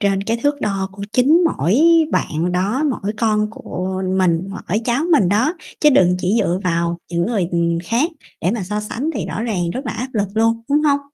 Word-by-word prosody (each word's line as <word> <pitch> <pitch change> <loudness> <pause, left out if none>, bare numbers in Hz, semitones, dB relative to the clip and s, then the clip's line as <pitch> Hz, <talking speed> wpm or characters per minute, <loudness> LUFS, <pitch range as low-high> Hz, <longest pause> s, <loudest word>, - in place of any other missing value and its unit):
trên 195 -1 +1
cái 225 +3 -1
thước 290 0 +1
đo 195 -4 -1
của 200 - -9
chính 290 +9 +4
mỗi 185 - +1 0.4
bạn 165 +4 0
đó, 200 +10 0
mỗi 210 -5 -3
con 215 -2 +1
của 185 -3 -5
mình, 185 0 +1 0.2
mỗi 205 +5 +1
cháu 245 +5 0
mình 230 - +4
đó, 230 - +2 0.3
chứ 300 - +6
đừng 180 -9 +4
chỉ 185 +4 0
dựa 180 -3 0
vào 170 -1 0
những 170 0 0
người, 205 -7 0
ừm, 170 -1 +1
khác 245 - +1 0.3
để 180 - +1
mà 225 -1 -2
so 210 +3 -3
sánh 235 +8 -3
thì 205 -9 -3
rõ 225 - -4
ràng 180 -7 -1
rất 260 +6 -5
là 220 - -2
áp 250 +3 -4
lực 205 -3 0
luôn, 225 +1 +1
đúng 295 +1 +2
hông? 285 -2 +3
210 Hz, 215 wpm, -19 LUFS, 180-240 Hz, 0.4 s, chứ